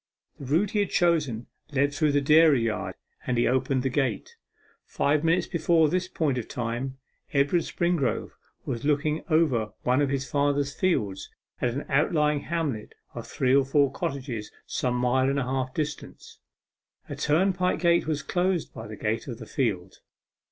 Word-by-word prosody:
The 140 - -7
route 165 +10 +1
he 210 - 0
had 200 -2 +1
chosen 150 -10 +1 0.3
led 140 0 +1
through 150 +1 +2
the 145 - +3
dairy 150 -3 +5
yard, 110 -2 -2 0.3
and 125 - 0
he 120 - +3
opened 130 +1 +1
the 135 - +1
gate. 130 -6 -2 0.5
Five 150 +2 0
minutes 170 +2 +2
before 165 -1 +2
this 185 +2 0
point 150 -8 -1
of 115 - -6
time, 125 +1 -4 0.4
Edward 140 +5 +3
Springrove 170 -9 -1 0.3
was 115 - -4
looking 150 +1 0
over 130 -10 +2
one 125 +3 +2
of 140 - +1
his 140 0 -2
father's 145 0 0
fields 100 - -1 0.3
at 120 -1 0
an 140 - -4
outlying 150 +1 +2
hamlet 150 -8 -3 0.2
of - - -7
three 130 -1 +1
or 140 - +5
four 140 0 +2
cottages 135 -8 -4
some 125 -1 -1
mile 125 +2 +2
and 140 - 0
a 135 - +1
half 130 0 -2
distant. 150 0 -5 0.8
A - - -6
turnpike 180 +4 +1
gate 170 -2 +3
was 150 -2 -1
close 180 -2 0
by 110 -3 -10
the 105 -1 -8
gate 110 +4 -2
of 120 -4 -5
the 115 - -9
field. 100 -8 -2
140 Hz, 170 wpm, -26 LUFS, 125-160 Hz, 0.8 s, dairy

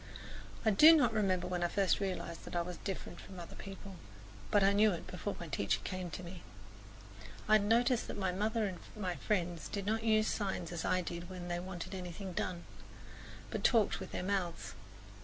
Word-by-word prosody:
I 220 - +5
do 310 +11 +9
not 295 - +4
remember 190 -4 +1
when 180 -1 -2
I - - +3
first 195 +1 +2
realized 185 -4 -3
that - - -7
I 170 - +2
was 180 0 -6
different 185 -3 -5
from 190 -2 -10
other 170 - -8
people; 195 -1 -9 0.5
but 205 -1 +4
I 195 +1 +5
knew 210 +1 +5
it 170 - -5
before 195 +3 -4
my 170 - -6
teacher 100 -7 0
came 185 -1 -4
to 170 +3 -6
me. 175 0 -8 1.1
I 215 - +4
had 200 - -2
noticed 235 +3 +3
that - - -5
my 190 -2 0
mother 215 +4 0
and 185 -3 -4 0.2
my 185 -4 -2
friends 175 -5 -1
did 200 -1 -4
not 220 +2 +1
use 215 -1 +4
signs 190 -5 -2
as 170 -2 -3
I 185 0 +2
did 170 0 -6
when 180 -1 -6
they 175 0 -1
wanted 180 0 -6
anything 185 +1 -6
done, 175 0 -2 0.9
but - - -3
talked 225 -5 +4
with 190 - -7
their - - -3
mouths. 185 -3 -2
185 Hz, 200 wpm, -34 LUFS, 175-205 Hz, 1.1 s, do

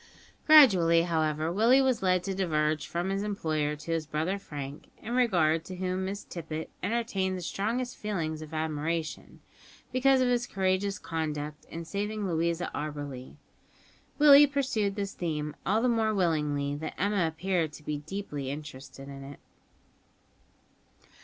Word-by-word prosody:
Gradually, 185 - +7
however, 160 -1 0
Willie 230 +8 +5
was 260 -5 +2
led 185 -1 +2
to 195 - -2
diverge 155 -5 0
from 175 +3 -2
his 195 0 -1
employer 155 -8 -1
to 150 +3 -7
his 160 -2 -1
brother 160 +6 -1
Frank, 145 -5 -8
in 235 - -6
regard 170 -10 +3
to 185 - -7
whom 185 +1 -2
Miss 200 +2 -4
Tippet 160 -2 -6
entertained 195 -5 -1
the - - -6
strongest 240 +8 -2
feelings 165 -7 -3
of 155 -1 -9
admiration, 160 +1 -3 0.5
because 265 +1 +4
of 255 - +3
his 245 0 +1
courageous 195 +1 0
conduct 150 -2 -4
in 165 +1 -7
saving 205 +3 -3
Louisa 170 0 -1
Auberly. 145 -4 -6 0.8
Willie 290 -1 +8
pursued 255 -8 -1
this 200 -2 -3
theme 150 -3 -3
all 215 +5 +2
the - - +3
more 220 -2 +1
willingly 150 -6 0
that 155 +1 -6
Emma 200 -2 +2
appeared 165 0 -1
to 150 - -12
be 150 -1 -3
deeply 150 -4 -5
interested 135 -2 -8
in 135 -1 -9
it. 140 0 -10
170 Hz, 145 wpm, -29 LUFS, 155-205 Hz, 0.8 s, Willie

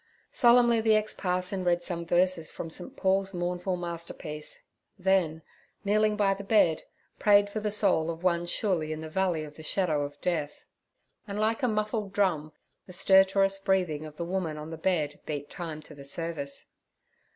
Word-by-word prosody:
"' - - -42
Solemnly 240 -1 +6
the 220 -1 +4
ex 215 0 0
parson 185 +1 -1
read 175 -1 +1
some 170 -2 -3
verses 175 -1 +2
from 165 - -6
St. 175 - -5
Paul's 195 0 +1
mournful 180 +1 -1
masterpiece, 170 -3 -6 0.3
then, 180 -4 +1 0.4
kneeling 210 +1 +2
by 200 -2 +3
the 200 +1 -7
bed, 195 -6 +3 0.4
prayed 205 -1 +5
for 215 - -2
the 210 0 -1
soul 195 -6 +2
of 165 +1 -5
one 175 -1 +1
surely 175 -4 0
in 155 0 -4
the 160 - -6
Valley 175 -2 0
of 150 -1 -11
the - - -9
Shadow 155 -2 +1
of 145 0 -5
Death. 155 -5 -2 0.6
And 200 0 -4
like 220 +4 +1
a 250 - +2
muffled 215 -2 -1
drum 170 -7 +1 0.4
the 180 - -9
stertorous 195 +1 +4
breathing 180 -6 0
of 150 0 -13
the 170 - -3
woman 175 -4 -2
on 150 +1 -7
the - - -4
bed 160 -4 0
beat 145 -2 -4
time 160 -3 -6
to 150 - -13
the 140 -1 -11
service. 145 -1 -4
180 Hz, 180 wpm, -28 LUFS, 160-195 Hz, 0.6 s, Solemnly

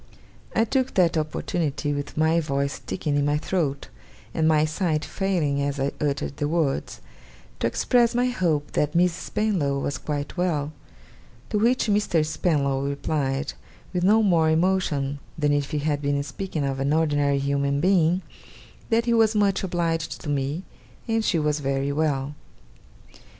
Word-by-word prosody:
I 225 - +4
took 260 +2 0
that 175 -3 +3
opportunity, 155 -1 -1
with 145 +1 -5
my 160 +2 +3
voice 140 -3 -1
sticking 150 -5 -3
in 145 - +2
my 145 +1 +2
throat, 150 -4 -2 0.4
and 160 -1 +2
my 155 -1 +4
sight 155 -1 -1
failing 170 -8 0
as 140 0 -2
I 135 +1 0
uttered 140 -1 -1
the 145 - -1
words, 150 - -1 0.6
to - - +1
express 240 -1 +2
my 245 +1 +3
hope 170 -12 0
that 150 +1 0
Miss 175 0 +4
Spenlow 175 -9 -1
was 140 -1 -3
quite 145 -1 -4
well; 160 -5 0 0.8
to 210 - +1
which 240 +4 +3
Mr. 205 -7 +2
Spenlow 140 -4 0
replied, 140 0 -2 0.4
with 180 -1 0
no 215 +4 +5
more 170 -5 +3
emotion 160 -5 +1 0.2
than 145 -2 +2
if 145 -1 0
he 150 - -2
had 145 0 -1
been 140 0 0
speaking 160 +1 -4
of 135 -1 -2
an 140 +2 +1
ordinary 145 -3 +2
human 140 0 0
being, 180 0 +3 0.7
that 230 0 +2
he 235 - +2
was 225 -1 +4
much 200 -2 +2
obliged 165 -3 -1
to 150 - -6
me, 145 +4 -1 0.4
and 225 -1 +1
she 175 - +1
was 150 -1 +1
very 135 0 -1
well. 145 -2 0
155 Hz, 160 wpm, -24 LUFS, 140-180 Hz, 0.8 s, no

